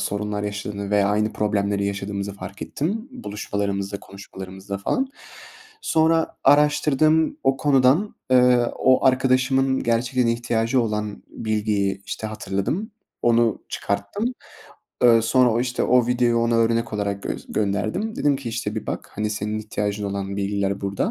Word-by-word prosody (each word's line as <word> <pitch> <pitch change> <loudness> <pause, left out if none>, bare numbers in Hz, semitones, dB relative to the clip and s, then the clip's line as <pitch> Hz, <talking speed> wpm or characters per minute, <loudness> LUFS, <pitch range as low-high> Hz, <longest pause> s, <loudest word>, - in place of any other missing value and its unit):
sorunlar 105 0 -2
yaşadığını 100 0 -4
veya 100 -1 +3
aynı 105 +1 +1
problemleri 100 -1 0
yaşadığımızı 100 0 -3
fark 100 +1 -8
ettim. 215 - -3
Buluşmalarımızda, 100 - -3
konuşmalarımızda 95 0 -8
falan. 265 - 0 0.7
Sonra 160 0 +2
araştırdığım 150 +1 +4
o 135 0 +3
konudan, 140 +8 +3 0.2
eee, 125 -1 +5
o 130 +1 +4
arkadaşımın 130 +1 +2
gerçekten 120 +1 +1
ihtiyacı 115 +1 +1
olan 105 -2 -3
bilgiyi, 105 -3 -1
işte, 110 - -4
hatırladım, 110 - -3 0.3
onu 115 -2 +2
çıkarttım. 100 - -3 0.8
Iıı, 115 -2 +6
sonra 125 +2 +4
o, 115 - +1
işte, 125 -1 -1
o 125 -1 +4
videoyu 120 -1 +2
ona 115 0 +1
örnek 115 0 +1
olarak 100 -1 -2
gös - - -5
gönderdim. 110 - -1
Dedim 145 -2 +2
ki 130 -4 -6
işte, 120 +1 -3
"Bir - - -5
bak, - - -4
hani, 105 +1 -1
senin 105 +1 -2
ihtiyacın 105 -1 -3
olan 100 0 -3
bilgiler 100 0 -1
burada." 100 0 -1
110 Hz, 135 wpm, -23 LUFS, 100-130 Hz, 0.8 s, Iıı